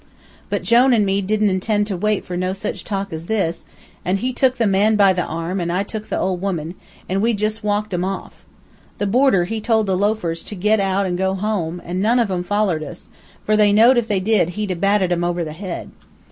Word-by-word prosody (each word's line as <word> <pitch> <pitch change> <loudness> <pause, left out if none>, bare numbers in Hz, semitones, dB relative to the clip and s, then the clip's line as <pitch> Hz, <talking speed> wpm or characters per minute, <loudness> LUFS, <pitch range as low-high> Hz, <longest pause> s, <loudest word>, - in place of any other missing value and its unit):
But - - -2
Jone 245 +2 +5
an' 210 -3 +3
me 195 +1 +1
didn't 210 +1 +1
intend 205 +3 0
to 205 -2 -3
wait 210 +3 0
for 180 - -5
no 185 +1 -1
sich 195 +2 -5
talk 195 -3 -4
as 160 +1 -6
this, 190 -7 -1 0.4
an' 185 +2 0
he 255 +5 -2
tuk 255 0 +2
the 235 - +1
man 205 +2 +3
by 200 -2 +5
the 180 - -1
arm, 165 +3 -3
and 170 -1 -2
I 185 +3 0
tuk 215 +1 -6
the - - -1
old 185 -2 -1
woman, 175 -4 -3 0.3
an' 190 +1 0
we 230 +1 +2
jus' 215 +2 -1
walked 210 -1 -1
'em 175 0 0
off. 195 +1 -5 0.5
The 205 - -1
boarder 225 -3 +3
he 220 +5 -4
told 220 -1 +2
the 190 -2 0
loafers 185 -4 -1
to 210 - -6
get 210 +3 +2
out 195 0 +1
an' 180 -1 -2
go 190 +1 0
home, 185 -4 -2
an' 180 +2 -3
none 230 +4 +3
of 230 -5 +1
'em 180 -1 -1
follered 195 -3 0
us, 155 +3 -9 0.3
for 215 - +2
they 210 -1 +4
know'd 230 +5 +6
if 230 - -3
they 205 -4 +1
did 195 -3 +2
he'd 210 -2 -2
a - - -1
batted 195 +1 +1
'em 175 0 0
over 175 0 -1
the 155 -2 -6
head. 180 +1 -6
195 Hz, 240 wpm, -20 LUFS, 180-215 Hz, 0.5 s, know'd